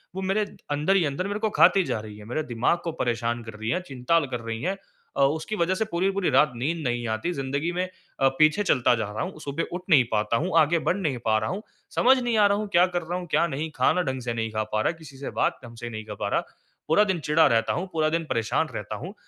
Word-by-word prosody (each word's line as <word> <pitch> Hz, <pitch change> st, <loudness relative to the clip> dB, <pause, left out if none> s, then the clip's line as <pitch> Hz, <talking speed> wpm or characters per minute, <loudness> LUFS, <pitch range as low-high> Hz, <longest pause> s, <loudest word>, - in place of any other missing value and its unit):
वो 190 Hz, -, -3 dB
मेरे 195 Hz, +3 st, +1 dB, 0.3 s
अंदर 150 Hz, +7 st, +2 dB
ही 190 Hz, -, +4 dB
अंदर 145 Hz, +7 st, -2 dB
मेरे 205 Hz, +1 st, -3 dB
को 220 Hz, 0 st, 0 dB
खाती 195 Hz, -1 st, +5 dB
जा 115 Hz, -, -2 dB
रही 105 Hz, -1 st, -10 dB
हैं। 105 Hz, -, -12 dB
मेरे 140 Hz, +8 st, -2 dB
दिमाग 125 Hz, +4 st, +1 dB
को 165 Hz, -, -2 dB
परेशान 120 Hz, -4 st, -2 dB
कर 110 Hz, -, -9 dB
रही 110 Hz, +1 st, -5 dB
हैं, 180 Hz, +6 st, 0 dB
चिंता 135 Hz, 0 st, 0 dB
ल 155 Hz, -, -2 dB
कर 125 Hz, -, -2 dB
रही 115 Hz, 0 st, -5 dB
हैं। 190 Hz, +2 st, -1 dB, 0.4 s
अ, -, -, +2 dB
उसकी 160 Hz, +9 st, -1 dB
वज़ह 180 Hz, 0 st, +1 dB
से 220 Hz, +3 st, 0 dB
पूरी 185 Hz, -2 st, 0 dB
की 195 Hz, -, +2 dB
पूरी 195 Hz, -4 st, 0 dB
रात 145 Hz, +3 st, +4 dB
नींद 145 Hz, +8 st, -1 dB
नहीं 120 Hz, 0 st, -1 dB
आती। 110 Hz, +10 st, -1 dB
ज़िंदगी 140 Hz, +3 st, -2 dB
में 180 Hz, +1 st, -1 dB, 0.4 s
अ, 135 Hz, -, +5 dB
पीछे 155 Hz, +7 st, +4 dB
चलता 125 Hz, -10 st, +3 dB
जा 110 Hz, -3 st, -3 dB
रहा 105 Hz, -, -4 dB
हूँ। 180 Hz, -3 st, -6 dB
सुबह 140 Hz, +3 st, -3 dB
उठ 180 Hz, -, -3 dB
नहीं 145 Hz, -7 st, +7 dB
पाता 110 Hz, +1 st, +1 dB
हूँ, 180 Hz, +4 st, -1 dB
आगे 160 Hz, +2 st, +3 dB
बढ़ 175 Hz, -, 0 dB
नहीं 150 Hz, -10 st, -1 dB
पा 110 Hz, -1 st, +3 dB
रहा 110 Hz, -, -1 dB
हूँ। 200 Hz, +4 st, -4 dB, 0.3 s
समझ 260 Hz, +2 st, +5 dB
नहीं 240 Hz, -3 st, 0 dB
आ 210 Hz, -, +6 dB
रहा 200 Hz, -, +2 dB
हूँ, 210 Hz, 0 st, -3 dB
क्या 180 Hz, -1 st, +5 dB
कर 175 Hz, -, +1 dB
रहा 175 Hz, +2 st, -3 dB
हूँ, 180 Hz, -, -8 dB
क्या -, -, +4 dB
नहीं? 155 Hz, +2 st, -3 dB
खाना 180 Hz, -, +3 dB
ढंग 130 Hz, -5 st, -3 dB
से 120 Hz, -1 st, -3 dB
नहीं 115 Hz, -1 st, -2 dB
खा 110 Hz, 0 st, -1 dB
पा 110 Hz, -, +2 dB
रहा, -, -, +2 dB
किसी 140 Hz, -4 st, -12 dB
से 140 Hz, -, -5 dB
बात -, -, +1 dB
ढंग 115 Hz, 0 st, -11 dB
से 120 Hz, 0 st, -6 dB
नहीं 110 Hz, -1 st, -7 dB
कर 105 Hz, -, -7 dB
पा -, -, -1 dB
रहा। -, -, +1 dB, 0.5 s
पूरा 160 Hz, +7 st, +5 dB
दिन 190 Hz, -4 st, 0 dB
चिढ़ा 160 Hz, +2 st, +5 dB
रहता 115 Hz, -1 st, +2 dB
हूँ, 185 Hz, +3 st, -3 dB
पूरा 155 Hz, -1 st, +2 dB
दिन 165 Hz, +1 st, -1 dB
परेशान 115 Hz, +8 st, 0 dB
रहता 105 Hz, +1 st, -5 dB
हूँ। 170 Hz, -, -7 dB
150 Hz, 280 wpm, -25 LUFS, 120-180 Hz, 0.5 s, नहीं